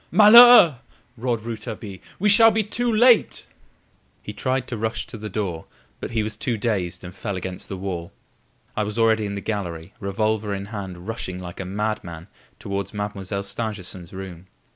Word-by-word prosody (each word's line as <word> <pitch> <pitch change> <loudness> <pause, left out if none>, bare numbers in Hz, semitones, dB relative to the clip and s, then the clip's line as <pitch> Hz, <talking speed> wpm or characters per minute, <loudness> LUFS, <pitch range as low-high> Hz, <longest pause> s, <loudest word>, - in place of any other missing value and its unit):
"Malheur!" 215 - +9 0.4
roared 120 -1 -2
Rouletabille; 110 -3 -7 0.2
"we 205 - +1
shall 225 +2 +7
be 220 0 +1
too 240 +4 -1
late!" 235 +1 +4 0.8
He - - -7
tried 130 0 -1
to 125 - -3
rush 110 +1 -3
to - - -11
the 105 -1 -6
door, 95 -5 -3 0.3
but - - -5
he 115 -2 -1
was 110 0 -4
too 120 -3 -2
dazed, 100 -6 -2
and 90 0 -8
fell 100 +1 -5
against 90 0 -6
the 95 - -5
wall. 90 -3 -5 0.6
I - - 0
was 105 +1 -3
already 110 -2 +3
in 100 - -5
the 100 - -5
gallery, 90 -5 -4
revolver 105 +1 -1
in 100 0 -5
hand, 95 -4 -7
rushing 110 -5 -4
like 90 -1 -9
a 95 - -4
madman 100 -3 -4 0.3
towards 100 +1 -5
Mademoiselle 100 -1 -4
Stangerson's 100 -4 -5
room. 95 -2 -9
105 Hz, 170 wpm, -23 LUFS, 95-115 Hz, 0.8 s, Malheur